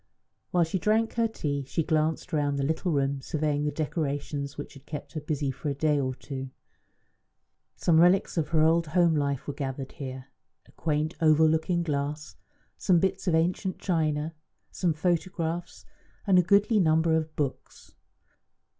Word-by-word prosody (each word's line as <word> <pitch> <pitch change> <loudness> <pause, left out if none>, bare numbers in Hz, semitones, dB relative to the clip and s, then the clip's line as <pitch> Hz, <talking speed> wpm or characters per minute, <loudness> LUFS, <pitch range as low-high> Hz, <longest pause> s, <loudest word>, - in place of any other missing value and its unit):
While 175 -1 +3
she 165 +3 -1
drank 220 +4 +1
her 230 -1 +2
tea 145 -10 -3
she 160 +4 -1
glanced 160 +3 0
round 145 -2 +1
the 140 - 0
little 160 +4 -1
room, 140 -2 0
surveying 150 +1 -1
the 150 - 0
decorations 145 -2 -3
which 145 - -7
had 140 -2 -16
kept 150 -2 -7
her 155 - -4
busy 145 -2 -2
for 145 +3 -5
a 140 - -2
day 150 0 +2
or 130 -2 -1
two. 135 -1 -6 1.3
Some 160 -2 +3
relics 180 +3 +4
of 160 -4 0
her 160 -2 +2
old 165 +1 +3
home 170 +1 +3
life 140 -3 -1
were 145 - -2
gathered 135 -1 -5
here 130 -2 -7 0.4
a - - -21
quaint 155 0 -1
oval 160 0 +5
looking 160 +2 +1
glass, 150 0 -3 0.4
some 180 -3 +4
bits 190 +2 -1
of 170 - +3
ancient 180 +3 0
china, 155 -3 -1 0.4
some 170 -4 0
photographs, 170 0 -2 0.4
and 190 -3 +5
a - - +7
goodly 200 +4 +3
number 160 -1 +3
of 155 -1 -2
books. 140 -3 -5
155 Hz, 165 wpm, -27 LUFS, 145-170 Hz, 1.3 s, a